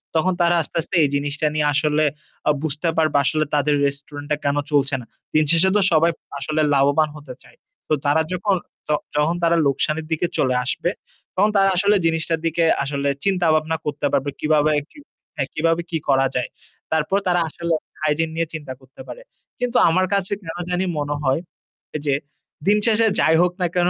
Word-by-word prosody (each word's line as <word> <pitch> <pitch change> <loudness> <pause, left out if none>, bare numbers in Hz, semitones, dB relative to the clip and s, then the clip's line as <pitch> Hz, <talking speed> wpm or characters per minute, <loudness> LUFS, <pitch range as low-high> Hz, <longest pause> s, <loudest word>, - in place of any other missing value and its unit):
তখন 180 +4 +2
তারা 175 0 +4
আস্তে, 150 - -10
আস্তে 170 - -6
এই 145 - +2
জিনিসটা 145 +2 -1
নিয়ে 150 -1 +2
আসলে 150 +1 +2 0.4
আ - - +5
বুঝতে 155 +2 -1
পারবে 155 -2 +3
আসলে 155 +1 +1
তাদের 145 0 +2
রেস্টুরেন্ট 145 +1 -7
টা 150 - +4
কেন 140 0 +2 0.2
চলছে 140 -1 +2
না। - - -12 0.3
দিনশেষে 165 +4 +4
তো - - +3
সবাই 165 +1 +4 0.3
আসলে 155 +3 -1
লাভবান 145 +3 +3
হতে 145 -4 -9
চায়। 125 -1 -20 0.3
তো - - +1
তারা 145 +3 +3
যখন 190 +2 +1 0.3
ত - - -20 0.3
যখন 155 +3 +2
তারা 170 0 +4
লোকসানের 150 +3 -1
দিকে 160 +2 +1
চলে 130 -1 +2
আসবে, 140 +6 -1 0.5
তখন 205 +3 +3
তারা 195 0 +5
আসলে 200 +3 +3
জিনিসটার 165 0 0
দিকে 165 +1 +1 0.2
আসলে 140 0 -1 0.2
চিন্তাভাবনা 160 -4 +2
করতে 145 0 -2
পারবে 140 +1 +1
কিভাবে 155 0 +2 0.2
কি - - -20 0.4
হ্যাঁ, 140 -3 -2
কিভাবে 165 +2 +1
কি 165 - -1
করা 135 -1 +4
যায়। 125 -1 -1 0.4
তারপর 160 +4 +1
তারা 175 -1 +3
আসলে 170 +2 -2 0.3
হাইজিন 155 +1 +1
নিয়ে 165 0 -1
চিন্তা 145 -4 -6
করতে 130 +1 -15
পারে। - - -9 0.4
কিন্তু 245 0 0
আমার 185 +3 +2
কাছে 195 -2 0
কেন 165 -2 -7
জানি 180 +1 0
মনে 145 0 -1
হয়, 135 +2 +2 0.6
এই 155 - -2
যে 140 - +2 0.5
দিন 205 +1 +5
শেষে 225 -1 +3
যাই 160 - +4
হোক 180 0 +3
না 180 - +3
কেন, 175 0 +3
155 Hz, 185 wpm, -21 LUFS, 145-170 Hz, 0.6 s, আ